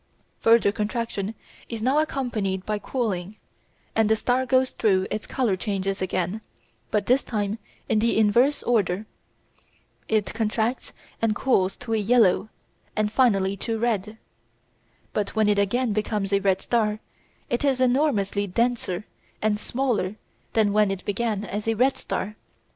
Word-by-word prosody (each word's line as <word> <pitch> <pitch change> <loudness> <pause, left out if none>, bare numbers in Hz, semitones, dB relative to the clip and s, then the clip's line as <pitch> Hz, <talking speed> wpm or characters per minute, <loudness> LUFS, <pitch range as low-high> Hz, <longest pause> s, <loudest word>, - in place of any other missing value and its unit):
Further 225 -2 +5
contraction 215 -1 -3 0.3
is 230 - -4
now 260 +7 +2
accompanied 225 -11 -1
by 210 -1 -1
cooling, 205 -5 -2 0.6
and 220 -1 +3
the 220 - +5
star 250 +3 0
goes 260 0 +3
through 190 -4 +2
its 210 0 -3
colour 245 -7 +1
changes 195 -1 -2
again, 185 +2 -1 0.5
but 210 -2 0
this 255 +3 +3
time 210 -1 -2 0.3
in 220 - +2
the 230 +1 +2
inverse 235 +7 +3
order. 210 -4 +1 1.0
It 215 -3 +1
contracts 225 +2 -1 0.3
and 225 -2 +2
cools 195 -8 +1
to 240 -2 -4
yellow 215 -2 +3 0.5
and 210 0 +1
finally 200 -6 +3
to 225 +3 -2
red. 220 -2 -1 1.0
But 210 0 -2
when 215 -1 +3
it 205 -1 +3
again 225 +3 +1
becomes 210 -1 -1
a 200 - +4
red 195 -1 +1
star 215 -3 +1 0.5
it 240 - 0
is 270 -3 +2
enormously 245 -7 +2
denser 215 -2 -1 0.3
and 210 -1 +1
smaller 235 -6 -1 0.4
than 210 -2 +3
when 210 -1 +4
it 195 -1 -4
began 210 0 -1
as 210 +2 -4
a 225 - +2
red 260 +4 +3
star. 210 +3 -4
215 Hz, 145 wpm, -25 LUFS, 200-235 Hz, 1.0 s, Further